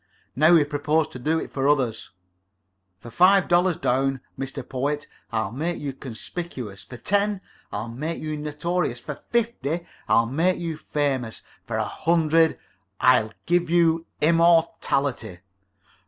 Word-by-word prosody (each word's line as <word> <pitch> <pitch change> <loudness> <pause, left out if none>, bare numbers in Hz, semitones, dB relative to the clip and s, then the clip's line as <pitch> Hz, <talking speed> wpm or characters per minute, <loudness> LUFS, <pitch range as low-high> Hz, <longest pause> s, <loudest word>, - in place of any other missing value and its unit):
Now 155 +5 +6
we 160 - +6
propose 150 +2 0
to 125 - -9
do 155 +6 +1
it - - -5
for 135 +1 +1
others. 125 -6 0 0.9
For 120 - -10
five 185 +4 +5
dollars 175 0 +3
down, 135 +1 0 0.2
Mr. 135 0 -6
Poet, 145 +3 -2 0.3
I'll 110 -3 -1
make 165 +8 -2
you 140 -2 -4
conspicuous; 130 - -7
for 120 - -10
ten, 205 +5 0 0.3
I'll 105 +3 -4
make 150 +8 -4
you 155 -1 -3
notorious; 150 -2 -2
for 150 +5 -6
fifty, 175 - -2 0.2
I'll 115 - +5
make 165 +10 +1
you 165 -2 -3
famous; 140 -6 -2 0.2
for - - -2
a - - 0
hundred, 165 -1 +2 0.4
I'll 125 -4 +4
give 175 -1 +1
you 165 -1 +3
immortality." 150 - +2
150 Hz, 140 wpm, -24 LUFS, 130-170 Hz, 0.9 s, Now